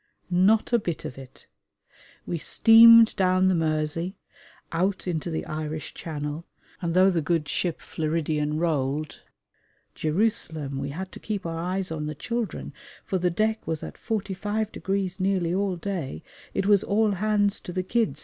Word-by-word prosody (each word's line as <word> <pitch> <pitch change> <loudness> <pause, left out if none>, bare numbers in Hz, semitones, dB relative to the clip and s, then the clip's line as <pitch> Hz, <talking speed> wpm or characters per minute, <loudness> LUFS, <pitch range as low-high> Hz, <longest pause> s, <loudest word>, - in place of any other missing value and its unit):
Not 200 +6 +3
a 235 - +5
bit 170 -6 -4
of 130 - -7
it. 130 -1 -14 0.8
We 170 - -3
steamed 230 +5 +7
down 185 -1 +3
the - - +3
Mersey, 160 +2 -1 0.6
out 185 +3 0
into 170 -1 -2
the 160 - -3
Irish 155 0 -5
Channel, 150 0 -5 0.4
and 170 -1 -2
though 190 +1 +6
the 170 -3 0
good 160 0 0
ship 175 -3 -1
Floridian 155 -1 -2
rolled 155 -2 -1 0.7
(Jerusalem! 160 -6 -1
we 140 +1 -3
had 185 +6 -6
to - - -10
keep 210 -4 -4
our 165 -1 -3
eyes 185 +1 -2
on 150 -2 -3
the 155 - -5
children, 235 +6 -4 0.3
for 190 - -1
the 180 0 +2
deck 215 +5 -1
was 160 -1 -3
at - - -6
45° 200 -2 -3
nearly 185 -3 +1
all 195 0 0
day: 170 - -4 0.3
it - - 0
was 200 -1 +4
"All 215 +1 +2
hands 205 +1 +1
to - - -8
the 185 +1 -2
kids!" 200 - 0
180 Hz, 160 wpm, -26 LUFS, 155-200 Hz, 0.8 s, steamed